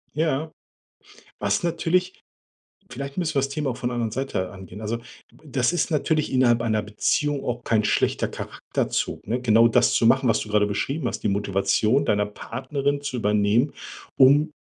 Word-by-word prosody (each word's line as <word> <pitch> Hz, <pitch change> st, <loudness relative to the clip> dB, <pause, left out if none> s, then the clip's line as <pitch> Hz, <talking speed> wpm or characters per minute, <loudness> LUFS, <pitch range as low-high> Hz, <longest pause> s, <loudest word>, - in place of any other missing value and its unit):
Ja, 155 Hz, 0 st, 0 dB, 0.9 s
was 100 Hz, -, 0 dB
natürlich 180 Hz, +2 st, 0 dB, 0.7 s
vielleicht 140 Hz, +5 st, -6 dB
müssen 160 Hz, -3 st, -1 dB
wir -, -, +2 dB
das 135 Hz, +1 st, -2 dB
Thema 145 Hz, -1 st, -2 dB
auch 120 Hz, -, -5 dB
von 120 Hz, -, -2 dB
'ner -, -, -4 dB
anderen 115 Hz, -2 st, -1 dB
Seite 115 Hz, -7 st, -3 dB
angehen. 95 Hz, +1 st, -11 dB
Also, 110 Hz, +2 st, -2 dB
d 115 Hz, -, -12 dB, 0.3 s
b -, -, -22 dB
das 130 Hz, 0 st, 0 dB
ist 175 Hz, -, 0 dB
natürlich 155 Hz, 0 st, 0 dB
innerhalb 120 Hz, -3 st, +3 dB
einer 110 Hz, -2 st, 0 dB
Beziehung 140 Hz, +7 st, -1 dB
auch 120 Hz, 0 st, -3 dB
kein 110 Hz, -2 st, +1 dB
schlechter -, -, +1 dB
Charakterzug, -, -, -3 dB
ne? 120 Hz, +3 st, -1 dB
Genau 115 Hz, -1 st, +5 dB
das -, -, +3 dB
zu 115 Hz, -, +3 dB
machen, 130 Hz, +1 st, +4 dB
was 115 Hz, -, +2 dB
du 105 Hz, -, -6 dB
grade 105 Hz, 0 st, +2 dB
beschrieben 130 Hz, +7 st, -2 dB
hast, -, -, -3 dB
die -, -, 0 dB
Motivation 100 Hz, +6 st, +1 dB
deiner 105 Hz, -3 st, +1 dB
Partnerin 135 Hz, +6 st, -3 dB
zu 140 Hz, -3 st, -4 dB
übernehmen, 105 Hz, +5 st, +2 dB, 0.4 s
um 145 Hz, +4 st, +5 dB
125 Hz, 180 wpm, -24 LUFS, 105-145 Hz, 0.9 s, Genau